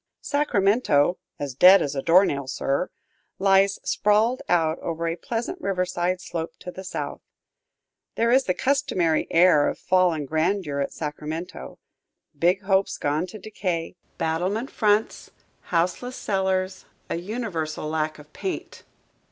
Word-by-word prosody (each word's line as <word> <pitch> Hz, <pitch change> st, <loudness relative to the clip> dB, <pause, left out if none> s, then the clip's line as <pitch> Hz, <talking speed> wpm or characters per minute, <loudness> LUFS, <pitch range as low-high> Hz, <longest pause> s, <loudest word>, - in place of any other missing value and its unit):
Sacramento 200 Hz, -, +2 dB, 0.2 s
"as 140 Hz, -2 st, -4 dB
dead 185 Hz, +8 st, +8 dB
as 140 Hz, -, -2 dB
a 135 Hz, -, -2 dB
door 180 Hz, +7 st, +5 dB
nail, 140 Hz, -5 st, -2 dB
sir" 140 Hz, +5 st, -1 dB, 0.5 s
lies 195 Hz, 0 st, +4 dB
sprawled 215 Hz, +4 st, +2 dB
out 165 Hz, -2 st, +2 dB
over 165 Hz, 0 st, -3 dB
a 165 Hz, -, -1 dB
pleasant 235 Hz, -, -4 dB
riverside 180 Hz, -, -1 dB
slope 170 Hz, -2 st, -5 dB
to 180 Hz, -, -8 dB
the 190 Hz, -, -9 dB
south. -, -, -5 dB, 0.9 s
There 230 Hz, +1 st, +2 dB
is 260 Hz, +1 st, +4 dB
the 185 Hz, -, 0 dB
customary 255 Hz, -, +1 dB
air 165 Hz, -4 st, +5 dB
of -, -, -2 dB
fallen 180 Hz, -5 st, +2 dB
grandeur 160 Hz, 0 st, 0 dB
at 140 Hz, -, -1 dB
Sacramento, 150 Hz, -, -6 dB, 0.6 s
big 180 Hz, +6 st, +2 dB
hopes 195 Hz, 0 st, +1 dB
gone 150 Hz, +5 st, -1 dB
to 200 Hz, -, -9 dB
decay; 185 Hz, -5 st, -4 dB, 0.2 s
battlement 185 Hz, +10 st, -1 dB
fronts, 210 Hz, 0 st, +1 dB, 0.4 s
houseless 180 Hz, +9 st, -1 dB
cellars, 190 Hz, -2 st, -1 dB, 0.2 s
a -, -, -2 dB
universal 175 Hz, -6 st, -4 dB
lack 155 Hz, 0 st, -2 dB
of 150 Hz, 0 st, -16 dB
paint. 380 Hz, -, -5 dB
180 Hz, 135 wpm, -24 LUFS, 160-200 Hz, 0.9 s, dead